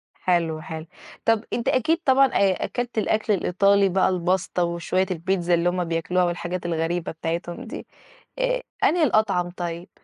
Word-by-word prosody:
حلو، 165 -3 0
حلو. 160 0 -7 0.4
طَب 225 0 +3
أنت 235 - -2
أكيد 290 +7 +2
طبعًا 270 0 +6
آآ 195 -6 +1
أكَلت 245 -1 -4
الأكْل 215 0 +1
الإيطالي 195 +1 +3
بقى 190 +1 +2
الباستا 185 0 0
وشوية 170 +2 0
البيتزا 175 0 0
اللي 170 +1 +3
هُم 180 0 -1
بياكلوها 170 +2 0
والحاجات 175 0 -3
الغريبة 165 0 -1
بتاعتهم 170 +6 -4
دي 240 - -8 0.5
آآ - - +1 0.2
أنهي 335 -1 +4
الأطعَم 215 -8 +2
طيب؟ 175 -1 -6
180 Hz, 150 wpm, -24 LUFS, 170-215 Hz, 0.5 s, طبعًا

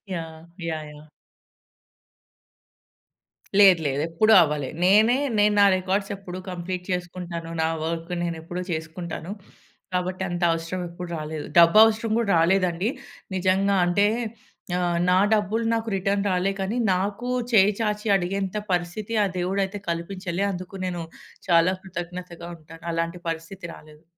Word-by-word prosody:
Yeah! 160 -1 -7 0.3
Yeah! 155 -1 -4
Yeah! 150 +1 -14 2.5
లేదు 190 -4 +8
లేదు. 140 +1 -1
ఎప్పుడు 215 +7 +3
అవ్వలే. 150 -4 0
నేనే 215 +7 +5 0.2
నేను 210 0 +4
నా - - +8
రికార్డ్స్ 195 +2 -1
ఎప్పుడు 185 -2 -8
కంప్లీట్ 180 +1 -4
చేసుకుంటాను. 175 -2 -4
నా - - +2 0.2
వర్క్ 165 +2 -4
నేను 170 -1 -2
ఎప్పుడు 175 +2 -5
చేసుకుంటాను. 160 +2 -5 0.6
కాబట్టి 185 +1 -1
అంతవసరం 175 0 -1
ఎప్పుడు 175 0 -8
రాలేదు. 155 0 -5
డబ్బవసరం 215 +6 +6
గూడా 205 -4 0
రాలేదండి. 180 +3 +2 0.5
నిజంగా 190 +2 +2
అంటే 200 +4 +3 0.7
ఆహ్, 175 -1 0
నా 180 - +4 0.2
డబ్బులు 215 +2 0
నాకు 225 0 -1
రిటర్న్ 195 +1 0
రాలే 185 +1 +1
కానీ, 195 +5 -2 0.2
నాకు 200 +6 -2 0.2
చేయి 205 -1 +6
చాచి 210 0 -1
అడిగేంత 195 +2 -1
పరిస్థితి 180 +5 -2
ఆ - - +3
దేవుడైతే 195 +2 -1
కల్పించలే. 175 +2 -3
అందుకు 185 +1 -7
నేను 175 -2 -3 0.4
చాలా 170 +1 +4
కృతజ్ఞతగా 175 -1 -7
ఉంటాను. 165 +1 -14
అలాంటి 165 +1 -2
పరిస్థితి 165 +3 -6
రాలేదు. 155 +1 -17
180 Hz, 125 wpm, -24 LUFS, 170-195 Hz, 2.5 s, లేదు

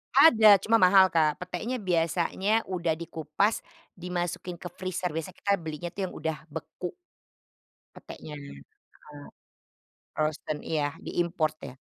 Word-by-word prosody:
Ada 220 - +8
cuma 225 +3 +2
mahal, 190 -1 +7
Kak. 155 -4 +2
Petenya 180 +8 -4
biasanya 175 +2 0 0.2
udah 175 -3 0
dikupas 165 +6 -1 0.3
dimasukin 175 0 -4
ke 175 - -6
freezer, 185 0 -3
biasa 165 - -4
kita 200 0 0
belinya 160 -1 -6
tuh 195 +3 -6
yang 185 - -4
udah 160 -1 -2
beku. 160 +3 -6 1.0
Petenya, 150 -1 -10
heeh. 70 - -12 1.4
Frozen, 155 0 -2
iya, 145 -3 -1
di-import 170 -3 -1
ya. 130 - -9
175 Hz, 120 wpm, -28 LUFS, 155-190 Hz, 1.4 s, Ada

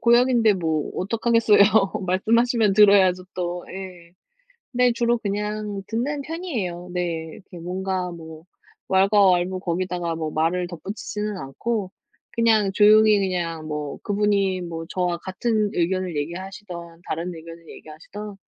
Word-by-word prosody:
고역인데 235 -2 +4
뭐 160 -4 -1
어떡하겠어요. 230 +2 +2 0.5
말씀하시면 225 +3 +2
들어야죠, 195 -3 +5
또. 175 -1 -3
예. 180 -3 -9 0.6
근데 250 -1 +3
주로 235 0 +1
그냥 210 -1 -3
듣는 275 +6 -2
편이에요. 240 - -4
네. 170 -2 -2
이렇게 185 -3 -13
뭔가 185 +1 -3
뭐 160 -2 -10 0.4
왈가왈부 190 -2 +3
거기다가 175 -1 -2
뭐 160 -1 -3
말을 170 +3 0
덧붙이지는 205 +4 -5
않고 190 - -3 0.4
그냥 220 -4 +3
조용히 215 +1 +6
그냥 170 -4 -2
뭐 150 -1 -4
그분이 200 -3 +1
뭐 165 -1 -6
저와 180 -2 -1
같은 210 +3 -1
의견을 180 -2 -1
얘기하시든 185 +5 -5 0.3
다른 170 +3 -3
의견을 165 0 -12
얘기하시든 200 +7 -10
190 Hz, 300 characters per minute, -23 LUFS, 175-210 Hz, 0.6 s, 조용히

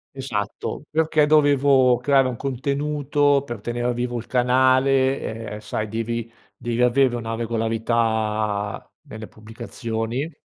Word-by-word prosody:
Esatto, 115 -5 -4
perché 155 -1 +2
dovevo 140 -4 +4
creare 135 -2 +3
un 125 - -3
contenuto, 140 +2 0
per 120 -4 -7
tenere 120 +2 -2
vivo 120 0 -3
il 115 - -7
canale, 130 -2 +1
ehm, 105 - -6
sai 110 0 -4
devi 115 +1 -3 0.3
devi 120 0 -2
avere 125 0 +3
una 115 -1 -4
regolarità 110 -2 -1 0.2
nelle 110 0 -8
pubblicazioni. 115 +5 -5
120 Hz, 115 wpm, -22 LUFS, 115-135 Hz, 0.3 s, dovevo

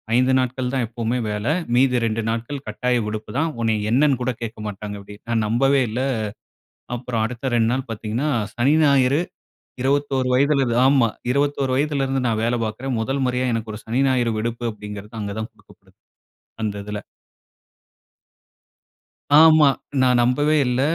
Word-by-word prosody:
5 130 +1 +3
நாட்கள் 125 0 -2
தான், 130 -3 +1
எப்பவுமே 115 +1 -2
வேல. 105 0 -3 0.3
மீதி 125 -1 +3
2 115 0 -1
நாட்கள், 115 +5 -3
கட்டாய 125 +3 0
விடுப்புதான். 115 +9 -2
உன்னய 110 -2 0
என்னன்னு 135 +1 +3
கூட 125 +1 0
கேட்க 115 0 -5
மாட்டாங்க, 105 0 -6
அப்படினு. 105 +1 -13
நான் 110 -2 +1
நம்பவே 135 +5 +3
இல்ல. 120 +4 -2 1.0
அப்புறம் 120 -2 -2
அடுத்த 125 +3 -3
2 115 -1 +2
நாள் 130 0 -2
பாத்தீங்கன்னா, 115 +6 -2 0.3
சனி, 130 +5 +3
ஞாயிறு. 140 0 +4 0.6
21 135 -1 +1
வயதிலதா. 135 -3 +2
ஆமா, 135 -4 +4 0.2
21 140 0 0
வயதிலிருந்து 135 -2 0
நான் 110 -1 0
வேல 120 +1 +1
பாக்கிறேன். 120 +4 -3
மொதல் 135 +4 -1
மொறயா, 125 0 0
எனக்கு 110 -1 -4
ஒரு 105 - -8
சனி, 120 +4 0
ஞாயிறு 125 -3 +1
விடுப்பு 115 +2 -3
அப்படிங்கிறது. 105 0 -9
அங்க 100 -1 -4
தான் 110 +2 -5
கொடுக்கப்படுது. 110 - -23 0.7
அந்த 105 -2 -2
இதுல. 105 0 -5 2.4
ஆமா. 155 -2 +7 0.3
நான் 125 -1 +4
நம்பவே 145 +5 +2
இல்ல. 125 +1 0
125 Hz, 145 wpm, -22 LUFS, 110-135 Hz, 2.4 s, ஆமா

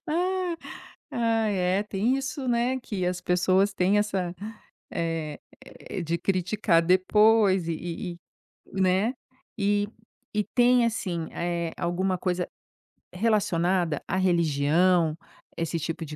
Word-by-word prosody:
Ah, 360 +2 0 0.6
ai 225 -3 +1
é, 185 +2 +1
tem 210 +5 0
isso, 270 0 -4
né, 245 +2 +1
que 200 -7 -3
as 180 0 -1
pessoas 185 +3 +2
têm 195 +2 +2
essa, 195 -4 -1 0.6
eh, 165 -3 -3 0.7
de 170 +1 0
criticar 185 0 +1
depois 190 +1 +4
e 165 - 0
e 175 +2 -5 0.6
e, 190 - 0
né, 190 +6 +2 0.4
e 205 0 +1 0.5
e 210 0 +1
tem 245 +1 +3
assim, 180 -8 -2
eh, 170 -1 -2
alguma 180 +2 0
coisa 180 0 -1 0.7
relacionada 180 -5 +1
à - - -1
religião? 170 -1 +2 0.4
Esse 165 0 -2
tipo 165 +1 -4
de 150 - -8
185 Hz, 120 wpm, -26 LUFS, 170-215 Hz, 0.7 s, depois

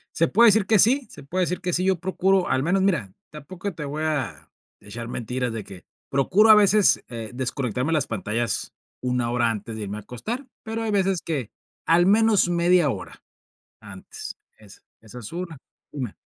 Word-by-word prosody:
Se 165 - +3
puede 235 +7 +5
decir 215 -1 +3
que 215 +1 +3
sí, 255 +6 +4
se - - -12
puede 180 +7 -1
decir 180 +1 -2
que 180 - -2
sí, 180 - +1
yo 190 -2 +1
procuro, 190 +1 +1
al 130 - +1
menos, 185 +5 +1
mira, 170 - 0 0.2
tampoco 180 +6 -7
te 155 -2 -6
voy 150 +2 -4
a 150 -5 -3 0.3
echar 115 +3 -8
mentiras, 125 +1 -3
de 110 -2 -5
que 95 -2 -12 0.2
procuro 185 +11 +3
a 215 - +10
veces, 210 -1 +4
eh, 115 -3 -7
desconectarme 125 0 -2
de - - +1
las 150 -3 +1
pantallas, 115 +2 -2 0.3
1 125 -2 -1
hora 120 -1 +2
antes 110 0 -5
de 110 - -5
irme 100 +1 -5
a - - -7
acostar, 220 - -6 0.2
pero, 225 +1 -4
hay 220 - -1
veces 195 -3 +1
que, 140 -9 -3 0.3
al 170 +2 +4
menos 210 -1 +4
1/2 175 -2 +3
hora 100 -7 -7 0.6
antes, - - -9 0.2
esa 105 -3 -16 0.2
esa 115 +2 -11
es 110 - -9
una, 170 -2 -5 0.4
una. 125 -7 -5
155 Hz, 190 wpm, -24 LUFS, 120-190 Hz, 0.6 s, a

